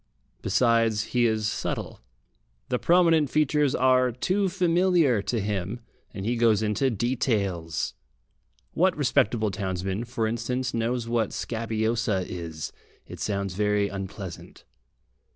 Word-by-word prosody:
Besides, 115 -3 +2
he 120 -1 +4
is 110 -1 0
subtle. 110 - -3 0.7
The 125 - 0
prominent 165 -4 +4
features 150 -1 +2
are 130 -1 +3
too 190 - 0
familiar 175 - +3
to 115 +3 -1
him, 100 +2 -3 0.3
and 100 -3 -6
he 120 +2 0
goes 110 -2 +3
into 110 +6 +1
details. 100 - -1 0.8
What - - +2
respectable 110 -1 +2
townsman, 95 +2 -3
for 120 -1 -2
instance, 125 +3 -2
knows 115 +1 -1
what 115 -3 +1
"scabiosa" 110 -3 -1
is? 80 -3 -6 0.3
It - - -10
sounds 100 -3 -2
very 105 +1 +1
unpleasant. 95 -2 -8
115 Hz, 115 wpm, -26 LUFS, 100-125 Hz, 0.8 s, he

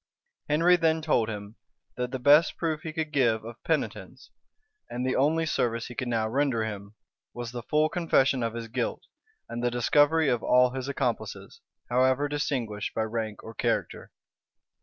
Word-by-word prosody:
Henry 170 +4 +4
then 160 -1 +2
told 120 -8 +2
him, 105 +1 -7 0.4
that 125 0 -2
the 130 - -3
best 145 +5 +5
proof 160 -2 -2
he 160 - -5
could 155 -1 -3
give 115 -5 +2
of 120 0 -10
penitence, 160 -2 -3 0.6
and 125 +1 -3
the 130 - 0
only 160 +4 +2
service 115 -6 -1
he 120 - -8
could 130 +1 -4
now 115 -2 0
render 130 -2 +1
him, 100 -1 -7 0.4
was 120 -1 -5
the 120 -1 -5
full 150 +6 +2
confession 145 -6 +2
of 115 0 -2
his 115 -1 -5
guilt, 125 +1 -3 0.4
and 120 +1 -5
the 120 - +2
discovery 145 +6 +3
of 120 -4 +1
all 125 0 +4
his 130 0 -5
accomplices, 140 - -3 0.3
however 130 +3 +2
distinguished 125 -8 -3
by 110 - +1
rank 110 -1 -4
or 115 - -9
character. - - -2
125 Hz, 170 wpm, -27 LUFS, 115-150 Hz, 0.6 s, best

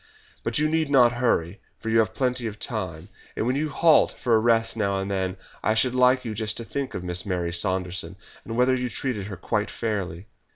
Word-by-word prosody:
But - - 0
you 150 +1 +2
need 160 -1 0
not 125 -4 +6
hurry, 115 -7 0 0.2
for 115 - -4
you 115 - +4
have 110 0 +1
plenty 125 -2 0
of 105 -1 -6
time, 95 -7 -5 0.3
and - - -1
when 125 +2 +1
you 150 +2 -1
halt 160 +1 +4
for 120 - 0
a 110 - +6
rest 115 0 +2
now 100 -3 0
and 95 +1 -3
then, 95 -1 -1 0.2
I 110 - +1
should 120 +3 +2
like 125 0 +4
you 110 - -3
just 110 0 -2
to 115 - -4
think 140 +2 -4
of 90 - -4
Miss 90 +1 -1
Mary 90 -4 -2
Saunderson, 90 0 -1 0.3
and 115 0 -5
whether 125 +1 +4
you 125 -1 -1
treated 110 -2 -3
her 100 -3 -7
quite 105 +3 -1
fairly." 100 -5 -3
110 Hz, 220 wpm, -25 LUFS, 95-125 Hz, 0.3 s, not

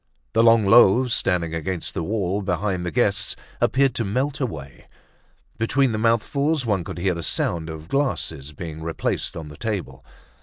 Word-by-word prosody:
The 115 - +4
long 115 -2 +5
loaves 120 +3 +6
standing 85 -3 0
against 85 +2 -3
the - - -2
wall 100 0 -1
behind 95 0 -1
the 90 - -2
guests 80 - 0 0.3
appeared 130 +3 +3
to 120 - -1
melt 130 +8 -1
away. 75 - -6 0.7
Between 135 +3 +2
the 110 - -2
mouthfuls 135 +6 +1
one 100 -5 0
could - - -7
hear 90 +1 +1
the 85 - -5
sound 80 0 -1
of 80 0 -8
glasses 80 - -2
being 80 +1 -7
replaced 80 0 -2
on 80 -2 -7
the 75 - -11
table. 95 -12 -4
100 Hz, 165 wpm, -23 LUFS, 85-115 Hz, 0.7 s, loaves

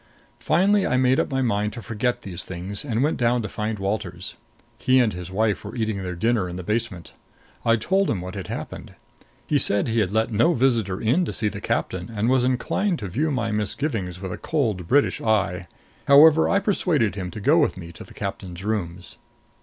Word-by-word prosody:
Finally 200 +2 +2
I 125 - +1
made 130 +1 +3
up - - 0
my 135 -1 0
mind 105 -2 0
to 120 - -7
forget 120 +1 -2
these 95 -1 -6
things 95 +2 -5
and 125 -3 -1
went 150 - +1
down 120 -1 +1
to - - -3
find 105 +2 -3
Walters. 95 -3 -4 0.5
He 130 0 +4
and 115 -4 +2
his 90 0 -7
wife 105 +2 0
were 105 +3 -8
eating 110 -4 -2
their 90 -1 -4
dinner 105 0 0
in 90 - -6
the 90 - -6
basement. 105 -3 -3 0.5
I 115 - +4
told 190 - +1
him 105 - 0
what 90 +1 -7
had - - -6
happened. - - -7 0.5
He 145 - +2
said 100 -5 +2
he 115 0 +1
had 100 -4 +1
let 110 +3 0
no 140 +11 +3
visitor 115 -7 +1
in 125 +11 +2
to - - -4
see 105 -2 0
the - - -8
captain, 90 +2 -2
and 110 +1 0
was 130 -1 +3
inclined 160 +9 0
to 100 -8 -6
view 150 - 0
my 120 -6 -1
misgivings 105 - -2
with 95 -1 -5
a - - -7
cold 110 - -1
British 140 +6 +2
eye. 95 -5 0 0.4
However, 155 +3 +7
I 200 - +3
persuaded 175 - +1
him 95 -2 -5
to 105 - -8
go 145 +10 +4
with 150 - +1
me 85 -2 -8
to 85 - -11
the - - -15
captain's 95 -3 -6
rooms. 90 -5 -4
110 Hz, 210 wpm, -23 LUFS, 95-130 Hz, 0.5 s, However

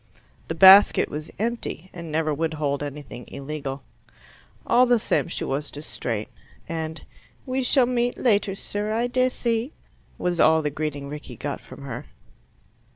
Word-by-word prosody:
The 165 - -3
basket 190 +4 +8
was 150 +1 -6
empty, 220 -5 -3
and 170 -3 -7
never 155 0 +1
would 160 +2 -1
hold 145 -2 -1
anything 145 -4 -7
illegal. 140 -1 -6 0.8
All 250 +2 +5
the 245 0 +5
same 220 - 0
she 170 - -4
was 145 +2 -2
distrait, 120 -7 -4 0.4
and 160 -1 -4 0.4
"We 260 0 -1
shall 255 0 +4
meet 245 0 0
later, 205 -5 +2
sir, 205 +2 -3
I 230 +2 +1
dessy," 245 0 0 0.4
was 175 -1 -1
all 160 0 +5
the 150 - -1
greeting 145 -1 -4
Rickie 150 +1 -8
got 145 - -4
from - - -12
her. 125 -3 -6
160 Hz, 150 wpm, -24 LUFS, 145-225 Hz, 0.8 s, basket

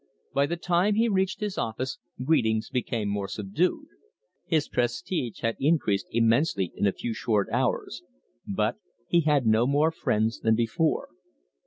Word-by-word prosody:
By 140 +1 +2
the 170 - -2
time 180 +4 +2
he 230 +2 +3
reached 190 -1 0
his 210 -2 -2
office, 125 +4 -3 0.2
greetings 115 -7 +1
became 120 -4 -1
more 100 -1 -2
subdued. 110 - -1 0.6
His 155 -4 +1
prestige 120 - -2
had 115 0 0
increased 140 -9 +1
immensely 115 - +2
in 100 - +1
a - - +3
few 115 +4 -4
short 105 -1 0
hours, - - -1 0.5
but 105 +3 0 0.3
he 170 - +3
had 145 -5 +2
no 110 +2 +4
more 145 +4 +3
friends 110 -7 0
than 110 -1 +3
before. 120 +8 0
120 Hz, 150 wpm, -27 LUFS, 110-165 Hz, 0.6 s, no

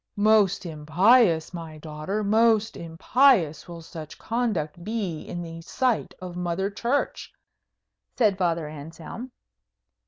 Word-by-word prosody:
"Most 205 -3 +3
impious, 170 - +3
my 165 -3 -7
daughter, 155 +7 -4
most 220 +1 +3
impious 170 - +2
will 170 -1 -9
such 160 -1 -9
conduct 195 -9 -2
be 200 -6 -3
in 175 0 -6
the 165 0 -8
sight 250 +7 -1
of 180 -2 -7
Mother 180 +3 -2
Church," 240 +7 -2 0.9
said 215 -6 +3
Father 170 -4 0
Anselm. 160 - -9
180 Hz, 115 wpm, -25 LUFS, 165-220 Hz, 0.9 s, Most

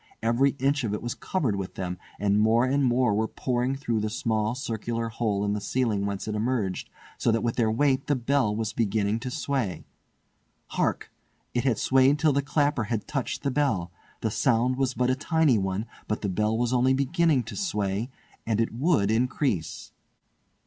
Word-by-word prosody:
Every 125 +5 +2
inch 140 +1 +1
of 105 -3 -1
it - - -5
was 120 - -2
covered 135 - -1
with 95 -2 -5
them, 90 -1 -4 0.2
and 100 +1 +2
more 115 +3 +4
and 140 +2 +1
more 125 -3 +3
were 110 +2 +1
pouring 125 +2 -1
through 125 -5 -1
the 105 0 -1
small 110 0 -1
circular 115 -2 -3
hole 110 -3 -1
in 100 - 0
the 105 - -2
ceiling 105 -2 0
whence 100 0 -4
it 110 - -2
emerged, 105 -3 -1 0.3
so 115 - +2
that 115 -1 0
with 120 -1 0
their 115 -3 +2
weight 135 +3 +1
the 145 - +2
bell 125 -3 +1
was 110 -1 -2
beginning 110 -1 0
to 130 +2 -5
sway. 135 - -2 0.8
Hark! - - -1 0.4
it 120 +1 0
had 125 -5 +2
swayed 135 +2 +4
till 150 -1 +3
the 140 - +2
clapper 145 -3 +1
had 110 -1 -3
touched 140 -3 -3
the 140 - 0
bell. 125 -12 0 0.3
The 110 - 0
sound 120 +2 +2
was 130 -1 0
but 125 0 +2
a - - +2
tiny 150 -4 +2
one, 95 +2 -2 0.2
but 110 - -2
the 100 - 0
bell 105 +4 0
was 120 +1 0
only 130 +1 +3
beginning 140 0 +2
to 115 - -8
sway, 105 - -1 0.3
and 110 -1 0
it 115 - 0
would 125 - +2
increase. 120 - -1
120 Hz, 190 wpm, -26 LUFS, 105-135 Hz, 0.8 s, more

